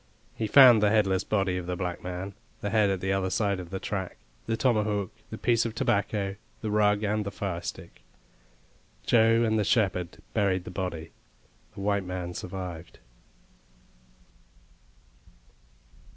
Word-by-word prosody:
He 110 - -3
found 125 -3 +8
the 105 - +4
headless 100 -3 +2
body 95 -3 0
of 90 -1 -5
the 90 - -2
black 90 0 -4
man, 90 +2 -5 0.3
the 100 - -2
head 105 -2 +3
at 95 -2 -1
the 95 0 0
other 95 -1 0
side 100 -1 0
of 90 -2 -8
the 95 +1 -4
track, 95 -3 -4 0.3
the 115 0 0
tomahawk, 105 -6 +1 0.2
the - - -6
piece 115 -1 +2
of 115 -1 -4
tobacco, 100 -1 0 0.2
the 110 - -3
rug, 105 0 +3
and 105 0 0
the 100 - -4
firestick. 90 -4 -6 1.0
Joe 115 0 +4
and 110 -1 +2
the - - +2
shepherd 95 -5 0 0.2
buried 95 -4 +1
the 90 - -8
body; 90 -4 -4 0.6
the 100 - -7
white 100 0 +1
man 90 -1 -5
survived. 90 -2 -7
100 Hz, 150 wpm, -27 LUFS, 90-110 Hz, 1.0 s, found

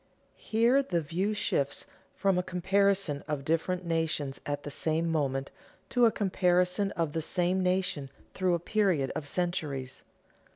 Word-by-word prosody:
_ - - -37 0.3
Here 235 +5 +2
the 180 -11 -1
view 180 +7 -1
shifts 140 -8 -1 0.3
from 195 -2 +2
a - - +2
comparison 190 -3 +1
of 145 -3 -3
different 175 +3 0
nations 160 -4 -1
at 145 0 -2
the 145 - -6
same 165 +3 0
moment 135 -3 -1 0.4
to 245 -2 +5
a - - +3
comparison 180 -1 +2
of 165 -4 -1
the 160 - -1
same 180 +3 +1
nation 180 -6 0 0.2
through 185 -2 +1
a - - -2
period 175 -7 +1
of 150 -1 -4
centuries. 145 -7 -2
175 Hz, 155 wpm, -29 LUFS, 150-190 Hz, 0.4 s, to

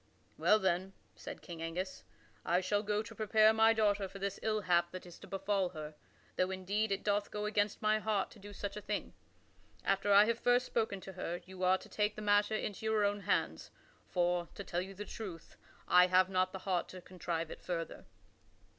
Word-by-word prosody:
"Well, 215 - +4
then," 190 -1 0 0.2
said - - -9
King 170 -2 -8
Angus, 180 +3 -4 0.4
"I 175 - +2
shall 205 +2 0
go 210 0 0
to - - -10
prepare 215 0 +4
my 220 0 +5
daughter 205 -3 +2
for 195 - -10
this 195 0 -3
ill 215 -1 0
hap 175 -2 +2
that 185 +1 -8
is 175 -1 -12
to - - -12
befall 195 -1 0
her, 155 -3 -7 0.4
though 185 - +2
indeed 200 +3 -1
it 195 - -1
doth 205 0 +1
go 210 0 -3
against 210 0 0
my 215 0 +3
heart 215 -3 0
to 215 - -14
do 205 +1 -10
such 200 0 -5
a 210 - -5
thing. 210 0 -3 0.7
After 195 +1 +2
I 200 +1 +8
have 230 +1 0
first 245 +1 +3
spoken 220 -4 -1
to 190 - -9
her, 175 -1 -4
you 185 0 -10
are 185 0 +4
to - - -13
take 210 0 0
the 215 - -6
matter 205 +1 +3
into 210 -1 -4
your 215 -1 +3
own 205 0 0
hands, 200 0 -1 0.4
for, 175 -1 +1
to 200 - -6
tell 175 -1 -2
you 195 +1 -7
the 210 +2 -6
truth, 190 -8 -8 0.3
I 180 0 +7
have 185 +1 +4
not 185 -1 +1
the - - -5
heart 185 -3 0
to 185 - -9
contrive 170 -3 -4
it - - -9
further." 165 -2 -4
195 Hz, 210 wpm, -34 LUFS, 185-210 Hz, 0.7 s, I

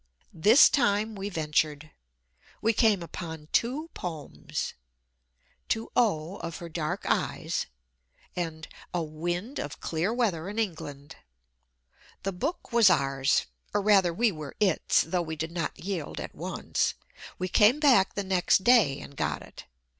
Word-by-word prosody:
This 215 - +7
time 220 -4 +1
we 200 0 -4
ventured. 155 -3 -1 0.7
We 225 +1 +2
came 210 -5 +3
upon 160 -2 -7
two 295 +8 0
poems 160 -5 -5 1.0
"To 225 0 -1
O, 190 -6 +1
Of 165 -1 -6
Her 170 - -8
Dark 155 -1 -3
Eyes," - - -1 0.7
and 160 -3 -4 0.3
"A 175 - 0
Wind 175 - -4
of 145 - -5
Clear 165 +6 -1
Weather 200 -8 0
in 210 - -7
England." 150 -9 -4 1.1
The 195 0 -2
book 280 - -4
was 230 -4 +7
ours 135 -5 +2 0.3
or 205 - +3
rather, 195 -4 +4
we 225 +6 +2
were 155 -5 -8
its, 195 -5 +3
though 175 +2 -1
we 160 -1 -4
did 160 +1 -4
not 170 -3 -3
yield 180 -5 -4
at - - -6
once. - - -2 0.4
We 185 - -2
came 215 +9 +5
back 255 -10 +4
the 200 - -1
next 190 0 +2
day 205 - +5
and 140 - -11
got - - -2
it. - - -13
180 Hz, 145 wpm, -28 LUFS, 160-215 Hz, 1.1 s, This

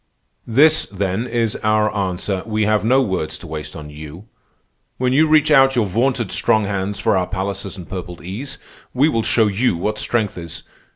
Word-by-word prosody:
"This, 150 +7 +4
then, 100 +4 -2
is 115 -2 -1
our 110 0 +1
answer. 95 0 -2
We 110 -1 0
have 105 0 +2
no 130 +4 +3
words 95 -8 -3
to - - -12
waste 75 -1 -7
on 75 -2 -9
you. 75 +6 -10 0.7
When 125 0 0
you 155 +4 +4
reach 155 0 +4
out 135 -2 +5
your 120 -3 +2
vaunted 120 +2 0
strong 110 -1 +2
hands 100 0 -3
for - - +2
our 90 -1 0
palaces 95 0 -4
and 90 - -9
purpled 90 -3 -7
ease, 115 +10 -6 0.4
we 135 +4 +4
will 115 -7 0
show 110 0 +2
you 105 -1 +1
what 105 +5 -2
strength 110 -6 -1
is. 85 -1 -7
105 Hz, 185 wpm, -19 LUFS, 95-120 Hz, 0.7 s, out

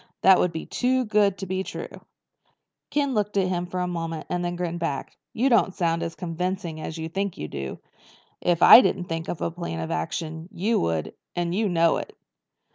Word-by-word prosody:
That 190 -1 +7
would 180 - +2
be 160 -1 -5
too 255 0 +1
good 205 -2 +2
to 195 - -5
be 190 0 -2
true." - - -7 0.9
Ken 285 -2 0
looked 210 -2 0
at 190 -2 +2
him 175 -1 -1
for 180 +1 -4
a 180 - -1
moment 165 -2 -4
and 180 0 -1
then 175 0 -1
he - - -6
grinned 175 -1 -3
back. 145 -5 -3 0.2
"You 250 +4 +1
don't 230 -7 +3
sound 165 -1 0
as 165 -1 -4
convincing 180 -1 -3
as 160 - -5
you 160 0 -4
think 195 +3 -3
you 75 - -4
do. 70 -2 -5 0.6
If 175 -1 +2
I 240 - +11
didn't 190 -7 0
think 165 -1 -4
up 175 - -4
a - - -1
plan 170 - -5
of 80 - -4
action, 160 - -3
you 210 +4 +1
would—and 85 - -3
you 210 +2 +1
know 170 -2 +3
it." - - -7
175 Hz, 205 wpm, -25 LUFS, 165-195 Hz, 0.9 s, I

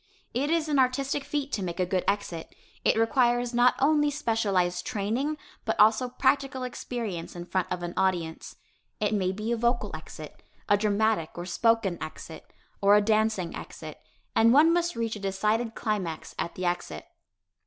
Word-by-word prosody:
It 275 +5 0
is 325 -1 +1
an 290 -2 +2
artistic 270 +2 +1
feat 290 -1 -3
to 205 - -2
make 175 -1 -4
a 180 - +2
good 180 0 0
exit. 200 -5 -2 0.3
It - - +3
requires 240 +1 +2
not 245 +1 +4
only 295 +1 +3
specialized 200 -10 0
training, 250 +7 -2 0.3
but - - -2
also 220 +4 +5
practical 265 +1 +1
experience 230 -9 -5
in 175 0 -6
front 185 0 -2
of 180 -1 -3
an 175 0 -4
audience. 175 -4 -1 0.4
It 210 0 0
may 185 -3 +1
be 215 +4 -4
a 235 - +1
vocal 240 +1 0
exit, - - -10 0.3
a 205 - +5
dramatic 205 -4 0
or 175 - -4
spoken 220 -2 +1
exit, 160 +1 -9 0.3
or 200 +1 +6
a - - +7
dancing 215 -4 +1
exit, - - -9 0.4
and 230 +1 +5
one 310 +6 +6
must 345 0 0
reach 230 -1 -2
a - - -9
decided 215 +4 -1
climax 195 -8 -3
at 170 - -3
the 185 - -4
exit. 175 0 -3
220 Hz, 170 wpm, -27 LUFS, 185-255 Hz, 0.4 s, a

